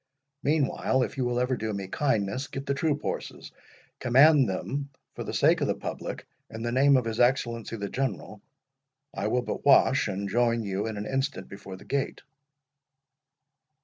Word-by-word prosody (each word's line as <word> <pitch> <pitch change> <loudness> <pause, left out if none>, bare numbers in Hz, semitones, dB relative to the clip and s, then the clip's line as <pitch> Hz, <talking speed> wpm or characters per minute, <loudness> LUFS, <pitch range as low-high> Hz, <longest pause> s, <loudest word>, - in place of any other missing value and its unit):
Meanwhile, 140 -3 +1
if - - -4
you 130 -2 -1
will 120 0 0
ever 125 +1 +1
do 110 -2 -3
me 100 -1 -4
kindness, 130 +1 -1
get 135 0 -6
the 140 - 0
troop 145 +1 -1
horses—command 135 +1 +1
them 140 +9 -3 0.2
for - - -6
the - - -5
service - - +3
of - - +1
the - - 0
public, - - -6 0.2
in 110 0 -7
the 120 - -1
name 135 +2 +5
of 125 - 0
his 115 0 -3
Excellency 120 -2 +1
the 100 -2 -4
General. 125 -4 -3 0.7
I - - -2
will 125 0 +1
but - - -4
wash, 135 -2 +5
and 100 0 -3
join 115 +2 +1
you 100 +1 -2
in 110 -2 -4
an 105 - -4
instant 135 +4 -2
before 95 -1 -9
the - - -15
gate." 140 -1 -2
125 Hz, 175 wpm, -27 LUFS, 110-135 Hz, 0.7 s, name